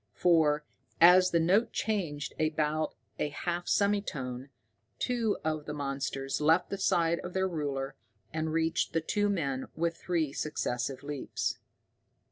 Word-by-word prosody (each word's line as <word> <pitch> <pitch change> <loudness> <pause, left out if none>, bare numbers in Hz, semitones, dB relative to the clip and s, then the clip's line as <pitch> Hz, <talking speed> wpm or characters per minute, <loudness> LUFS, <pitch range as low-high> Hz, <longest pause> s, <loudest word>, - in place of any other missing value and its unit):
For, 155 -4 +3 0.3
as 180 +2 +8
the 170 - +2
note 195 +8 +3
changed 170 -10 -2
about 155 0 0 0.2
a 150 - 0
half 175 +4 -3
semitone, 145 -11 0 0.5
two 235 -4 0
of 155 -1 -1
the 150 - -5
monsters 135 -1 -2
left 160 +4 +3
the 200 - -1
side 170 -3 +2
of 180 - -7
their 190 0 +1
ruler 140 -5 -3 0.4
and 160 0 -1
reached 165 +1 0
the 165 - +2
two 205 +5 +1
men 140 -9 -1
with 170 0 0
three 165 -6 -1
successive 135 -3 -2
leaps. 145 -2 -3
160 Hz, 135 wpm, -30 LUFS, 145-180 Hz, 0.5 s, as